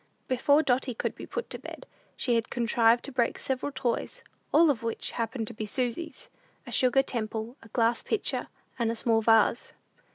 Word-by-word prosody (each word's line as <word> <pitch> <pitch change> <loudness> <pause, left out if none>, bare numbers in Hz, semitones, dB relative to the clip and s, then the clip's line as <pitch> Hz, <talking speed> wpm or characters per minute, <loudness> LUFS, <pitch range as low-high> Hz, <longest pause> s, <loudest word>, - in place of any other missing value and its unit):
Before 285 +4 +3
Dotty 250 -2 +1
could - - -2
be - - -10
put 475 - -4
to - - -4
bed, - - -9 0.3
she 245 - +1
had 230 -1 0
contrived 235 0 +3
to 280 - -7
break 245 -3 0
several 265 +2 -2
toys, 260 -3 -2 0.3
all 320 0 +6
of 240 -5 -3
which 230 -1 -3
happened 230 0 -3
to - - -8
be 215 0 -5
Susy's 255 +6 -3 0.4
a - - -9
sugar 260 +1 +3
temple, 225 -1 -3
a 230 - -14
glass 230 +1 +1
pitcher, 440 - -1 0.3
and 230 -1 +1
a - - -3
small 225 0 +2
vase. 225 +1 +3
240 Hz, 185 wpm, -28 LUFS, 230-265 Hz, 0.4 s, all